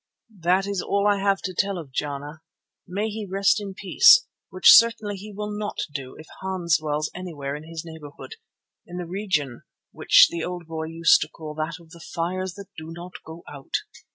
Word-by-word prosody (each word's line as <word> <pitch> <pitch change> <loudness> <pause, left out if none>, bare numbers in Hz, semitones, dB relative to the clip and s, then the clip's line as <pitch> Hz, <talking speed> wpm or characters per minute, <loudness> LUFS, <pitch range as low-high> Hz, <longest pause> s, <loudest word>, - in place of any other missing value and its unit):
That 180 +3 +2
is 200 -2 -2
all 200 0 0
I 205 -1 +3
have 195 0 +1
to 185 - -3
tell 200 0 0
of 155 -6 -9
Jana. 145 +2 -5 0.5
May 205 +4 -2
he 215 -1 -6
rest 195 +2 +2
in 195 -2 -7
peace, 435 - +6 0.2
which 185 - +7
certainly 230 -3 +5
he 205 +2 -9
will 210 +1 -5
not 210 0 -4 0.2
do 135 -3 -6
if 155 - -11 0.2
Hans 180 -3 0
dwells 155 0 -2
anywhere 150 -6 -5
in 150 +1 -9
his 165 -1 -6
neighbourhood, 160 - -10 0.5
in 175 - -8
the 180 - -4
region 170 - -2 0.3
which - - +6
the 170 -1 -3
old 180 -1 -5
boy 160 0 -5
used 165 +1 +4
to 150 - -3
call 155 -2 -9
that 155 +2 -3
of 165 -2 -19
the 170 - -13
"fires 180 +2 -4
that 200 0 -11
do 160 0 -9
not 175 +2 -9
go 160 +1 -11
out." 140 -2 -7
175 Hz, 195 wpm, -24 LUFS, 160-200 Hz, 0.5 s, which